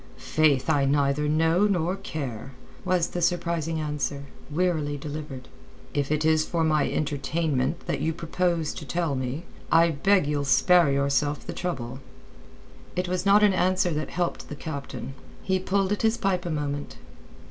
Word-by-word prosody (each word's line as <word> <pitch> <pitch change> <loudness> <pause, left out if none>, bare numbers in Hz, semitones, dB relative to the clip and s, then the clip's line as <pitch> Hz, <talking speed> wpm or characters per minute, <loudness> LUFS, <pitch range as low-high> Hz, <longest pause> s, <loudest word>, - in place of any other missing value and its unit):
"Faith, 145 -4 +2
I 145 -3 +3
neither 140 +1 +1
know 165 +6 +3
nor 180 -2 0
care," 135 - -6 0.3
was 180 -2 +1
the 175 - -4
surprising 170 -2 0
answer, 150 -2 -2 0.3
wearily 155 -3 0
delivered. 145 -3 -7 0.5
"If 145 0 -1
it 155 0 +1
is 160 -1 +4
for 165 +1 -1
my 155 -2 +2
entertainment 145 -1 -1
that - - -2
you 160 +2 +1
propose 165 -1 -1
to - - -7
tell 170 +1 -1
me, 130 +4 -3 0.3
I 165 0 +5
beg 185 +4 +3
you'll 145 -1 -1
spare 170 +3 +5
yourself 140 +1 0
the - - -5
trouble." 130 -8 -4 1.0
It 180 0 -1
was 180 +2 -1
not 205 +1 +6
an 205 -2 +5
answer 185 -1 +2
that 155 0 -2
helped 175 -1 -3
the 150 - -5
captain. 140 -3 -6 0.3
He 190 0 +1
pulled 195 +1 0
at 210 - 0
his 225 +1 +2
pipe 185 -2 0
a - - -2
moment. 145 - -3
155 Hz, 160 wpm, -26 LUFS, 145-175 Hz, 1.0 s, not